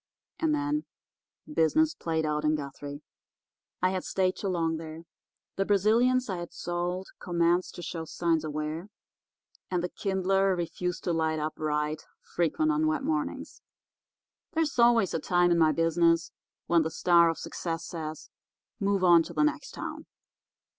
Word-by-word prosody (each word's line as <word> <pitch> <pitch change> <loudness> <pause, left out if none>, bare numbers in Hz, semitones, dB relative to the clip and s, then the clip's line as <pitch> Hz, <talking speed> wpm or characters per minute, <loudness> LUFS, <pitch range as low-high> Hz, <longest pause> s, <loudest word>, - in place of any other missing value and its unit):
And 315 -2 +2
then 295 +1 -1 0.7
business 310 - +3
played 160 -1 -2
out 150 0 -1
in 155 0 +3
Guthrie. 145 0 -7 0.8
"I 185 - +4
had 185 -1 -2
stayed 185 -1 0
too 200 - -4
long 165 -3 0
there. 160 0 -8 0.6
The 195 - +1
Brazilians 230 +6 +3
I 190 -3 -3
had 175 0 -6
sold 175 +2 -3
commenced 175 0 +1
to 175 - -8
show 165 -1 -5
signs 165 -1 0
of 155 - -4
wear, 155 +4 -4 0.8
and 180 -2 -1
the 180 - -1
Kindler 195 0 +1
refused 180 +1 -3
to 175 - 0
light 160 -1 0
up 155 0 -2
right 150 0 -1 0.2
frequent 245 - 0
on 315 0 +1
wet 310 -3 0
mornings. 315 +3 -3 0.9
There 325 - +2
is 285 -5 -3
always 235 -5 +5
a 165 - 0
time, 175 +2 +2
in 170 - +3
my 160 -1 +5
business, 165 +2 +2 0.3
when 170 -1 +4
the 160 - -1
star 170 +1 +4
of 165 - -2
success 165 -1 -4
says, 155 -2 -6 0.5
'Move 200 -2 +1
on 175 -2 +7
to - - -7
the - - +3
next 300 0 0
town. - - -7
175 Hz, 160 wpm, -28 LUFS, 160-195 Hz, 0.9 s, on